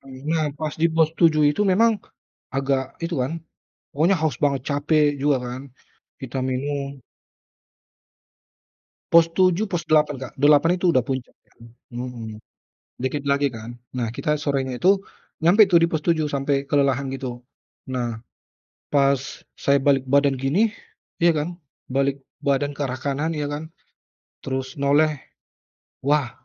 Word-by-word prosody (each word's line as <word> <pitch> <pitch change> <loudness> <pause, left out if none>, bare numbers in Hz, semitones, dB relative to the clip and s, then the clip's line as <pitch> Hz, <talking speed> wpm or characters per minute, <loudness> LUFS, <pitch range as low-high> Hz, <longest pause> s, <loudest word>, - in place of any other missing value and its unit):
Karena 135 +4 -3 0.2
pas 155 -1 -3
di 165 - +5
pos 160 -1 +4
7 155 -3 +5
itu 150 - 0
memang 220 +4 +4 0.6
agak 135 -1 -1
itu 170 0 -3
kan, 160 +6 -3 0.5
pokoknya 165 +7 +2
haus 155 -6 0
banget, 140 -2 0
capek 145 0 +2
juga 140 0 +2
kan, 125 +2 -6 0.6
kita 130 0 -5
minum. 140 +1 -3 2.1
Pos 165 0 +7
7, 185 +2 +3
pos 175 -3 -2
8, 150 -2 +2
Kak. - - -19
8 145 +3 +5
itu 185 - -1
udah 130 - +3
puncak 130 -1 -4
kan. - - -33 0.3
Mhm, 120 -3 -6 0.6
dikit 135 +2 -2
lagi 140 0 +2
kan. 115 0 -9 0.2
Nah, 120 -2 -1
kita 150 +5 -1
sorenya 135 -3 -2
itu 190 +6 +3 0.4
nyampe 200 +6 +7
tuh 175 -2 +6
di 170 - +4
pos 160 -2 -2
7, 160 -3 +2
sampai 140 0 0
kelelahan 140 -1 +1
gitu. 125 -3 -6 0.5
Nah, 120 -3 -3 0.7
pas 140 -1 +4 0.4
saya 140 0 +3
balik 135 -2 +3
badan 140 0 +3
gini, 160 - +2 0.5
ya 170 0 +5
kan, 170 +4 -3 0.3
balik 135 +1 0 0.2
badan 140 +1 +1
ke - - -11
arah 130 -1 -4
kanan 145 +3 -1
ya 150 -1 -2
kan, 155 +2 -5 0.8
terus 130 0 -4
noleh. 150 +2 +3 0.9
Wah, 145 -4 +2
140 Hz, 140 wpm, -23 LUFS, 135-155 Hz, 2.1 s, Pos